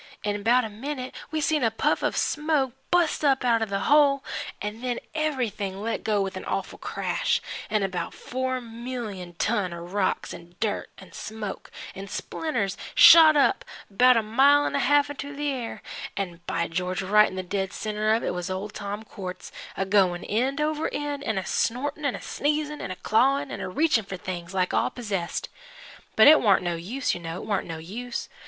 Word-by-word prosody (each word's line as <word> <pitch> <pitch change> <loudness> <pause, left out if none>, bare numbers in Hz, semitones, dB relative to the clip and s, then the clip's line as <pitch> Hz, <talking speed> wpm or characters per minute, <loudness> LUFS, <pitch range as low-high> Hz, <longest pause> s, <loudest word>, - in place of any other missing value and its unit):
In 205 -1 -1
'bout 240 +3 +3
a - - -5
minute 255 +4 -5 0.2
we 315 -1 -2
seen 305 -2 +1
a 225 - +4
puff 225 - 0
of - - 0
smoke 300 -4 +1 0.2
bust 345 -3 +2
up 270 -3 +3
out 230 -2 +3
of 220 - -1
the 195 0 -1
hole, 285 0 +4 0.4
'n' 210 +2 -5
then 250 -1 -2 0.2
everything 245 -11 -2
let 225 +2 -3
go 210 -2 +1
with 190 -1 -4
an 185 - -6
awful 195 - -3
crash, - - -1 0.3
'n' 215 -2 +1
about 180 -3 -2
four 260 0 -3
million 230 -7 -6
ton 205 -1 0
of 170 +1 -8
rocks 200 -2 0
'n' 175 +1 -12
dirt 215 -2 -1
'n' - - -14
smoke 215 -2 -6 0.2
'n' 195 +1 -8
splinters 225 -2 -3 0.2
shot 315 -2 +9
up 390 +8 +3 0.3
'bout 250 +5 +5
a 225 - +2
mile 275 +7 +5
an' - - -2
a - - +1
half 290 +2 +3
into 285 0 -7
the 290 +1 -1
air, 245 -4 -5 0.3
an' 180 -4 -4
by 170 0 -1
George, 180 +3 -2
right 210 +3 +5
in - - -9
the 185 - -3
dead 190 +1 -2
centre 215 0 0
of 230 - -2
it - - -1
was 180 0 -4
old 190 +3 -4
Tom 205 +1 -5
Quartz 185 -4 -8 0.3
a 195 - 0
goin' 190 -3 +2
end 255 +7 0
over 305 +1 0
end, 290 -1 -3
an' 220 -6 -1
a 190 - -2
snortin' 285 +5 -1
an' 265 - +1
a - - -6
sneez'n, 300 +1 -1
an' 195 - -5
a 185 - -4
clawin' 265 +9 +2
an' - - -5
a - - -4
reach'n' 235 - +2
for 195 -1 -6
things 175 -1 -6
like 185 -1 0
all - - +2
possessed. 195 -8 -3 0.7
But 220 - +7
it 310 +1 +8
warn't 200 -5 +4
no 175 -1 -1
use, 220 +11 -2
you - - -4
know, 165 0 -5
it - - -8
warn't 205 -3 -1
no 165 -1 -5
use. 230 +10 -5
220 Hz, 200 wpm, -26 LUFS, 190-275 Hz, 0.7 s, shot